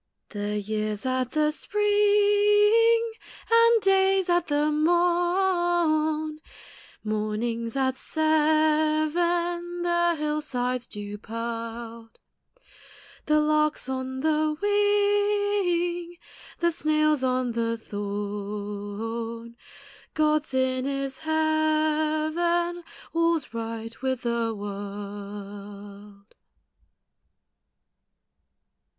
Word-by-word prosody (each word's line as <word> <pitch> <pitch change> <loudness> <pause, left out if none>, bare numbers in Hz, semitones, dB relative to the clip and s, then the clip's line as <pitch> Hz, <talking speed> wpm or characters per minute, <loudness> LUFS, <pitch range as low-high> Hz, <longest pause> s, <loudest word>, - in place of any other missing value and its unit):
The 210 0 -3
year's 215 +1 -3
at 255 -1 0
the 305 -1 +2
spring, 415 +4 +3 0.4
And 460 0 +5
day's 385 -1 +3
at 350 0 +2
the 295 +1 +1
morn; 345 -2 +1 0.6
Morning's 220 +2 -2
at 260 -1 +1
seven; 315 +3 +1
The 345 0 +2
hill 300 0 -1
side's 250 -3 -2
dew 205 -1 -7
pearled; 230 0 -6 1.1
The 305 0 +4
lark's 305 -2 +1
on 260 0 -4
the 310 0 +1
wing; 410 -4 +1 0.4
The 340 0 +3
snail's 305 -3 +1
on 255 -1 0
the 230 0 -1
thorn; 205 +3 -5 0.6
God's 305 -1 +1
in 260 0 +1
His 275 -1 -3
heaven 315 +2 +1 0.3
All's 335 -5 +1
right 230 0 -6
with 260 -2 -2
the 235 -1 -1
world. 200 0 -8
305 Hz, 75 wpm, -26 LUFS, 230-345 Hz, 1.1 s, And